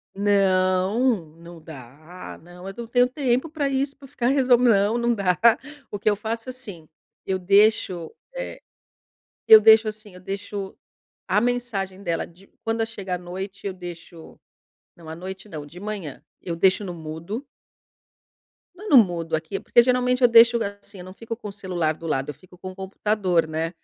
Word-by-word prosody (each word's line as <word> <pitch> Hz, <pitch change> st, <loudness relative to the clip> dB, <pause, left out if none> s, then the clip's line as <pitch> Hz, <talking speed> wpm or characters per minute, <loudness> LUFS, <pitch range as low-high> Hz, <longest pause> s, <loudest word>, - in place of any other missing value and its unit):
Não, 195 Hz, +2 st, +2 dB
não 170 Hz, 0 st, -13 dB
dá, 155 Hz, +3 st, -11 dB
não 175 Hz, +2 st, -13 dB
eu 195 Hz, -, -7 dB
não 235 Hz, -1 st, -6 dB
tenho 245 Hz, +1 st, +3 dB
tempo 255 Hz, +2 st, 0 dB
pra 295 Hz, -3 st, -2 dB
isso 275 Hz, +1 st, -1 dB
pra 275 Hz, -1 st, -14 dB
ficar 245 Hz, -1 st, -1 dB
resol 260 Hz, -3 st, +4 dB
Não 220 Hz, -3 st, +3 dB
não 235 Hz, 0 st, +1 dB
dá. 185 Hz, -4 st, 0 dB, 0.5 s
O 205 Hz, -, -4 dB
que 210 Hz, -, 0 dB
eu 205 Hz, -, +2 dB
faço 225 Hz, +3 st, -5 dB
assim, 205 Hz, -11 st, -7 dB, 0.4 s
eu 190 Hz, -1 st, 0 dB
deixo, 190 Hz, -3 st, +2 dB, 0.2 s
eh -, -, -6 dB, 0.9 s
Eu 220 Hz, -1 st, +10 dB
deixo, 220 Hz, 0 st, +6 dB
assim, 215 Hz, -2 st, -9 dB
eu 180 Hz, -, -12 dB
deixo 195 Hz, +1 st, -6 dB, 0.5 s
a 210 Hz, -, +3 dB
mensagem 215 Hz, -6 st, -2 dB
dela 170 Hz, -4 st, -2 dB
de 180 Hz, +3 st, -20 dB, 0.2 s
quando 225 Hz, 0 st, 0 dB
chega 200 Hz, -5 st, -5 dB
a 180 Hz, -, -3 dB
noite 190 Hz, +3 st, -7 dB
eu 195 Hz, -, -2 dB
deixo 175 Hz, -2 st, -11 dB, 0.6 s
Não 165 Hz, -2 st, -14 dB
à 160 Hz, -, -6 dB
noite 190 Hz, +3 st, -8 dB
não, 150 Hz, -5 st, -7 dB
de 175 Hz, +5 st, -12 dB
manhã, 200 Hz, -9 st, -6 dB, 0.2 s
eu 170 Hz, -, -4 dB
deixo 190 Hz, +4 st, +3 dB
no 180 Hz, -, -5 dB
mudo 165 Hz, -, -6 dB, 1.3 s
Mas 415 Hz, +4 st, -9 dB
não 275 Hz, -, +8 dB
mudo 170 Hz, -4 st, -4 dB
aqui, 160 Hz, +5 st, -5 dB
porque 240 Hz, -, +4 dB
geralmente 250 Hz, +1 st, +1 dB
eu 245 Hz, -, +7 dB
deixo 235 Hz, +1 st, +7 dB, 0.2 s
assim, 200 Hz, -1 st, -11 dB
eu 180 Hz, -, -9 dB
não 185 Hz, -, -11 dB
fico 230 Hz, +2 st, -6 dB
com 215 Hz, -3 st, -8 dB
o -, -, -7 dB
celular 180 Hz, -5 st, -2 dB
do 165 Hz, +1 st, -10 dB
lado, 135 Hz, -3 st, -1 dB
eu -, -, -8 dB
fico 180 Hz, -1 st, -19 dB
com 185 Hz, -, -7 dB
o 185 Hz, -, -13 dB
computador, 190 Hz, -3 st, 0 dB
né, 160 Hz, +1 st, -2 dB
195 Hz, 180 wpm, -24 LUFS, 175-230 Hz, 1.3 s, Eu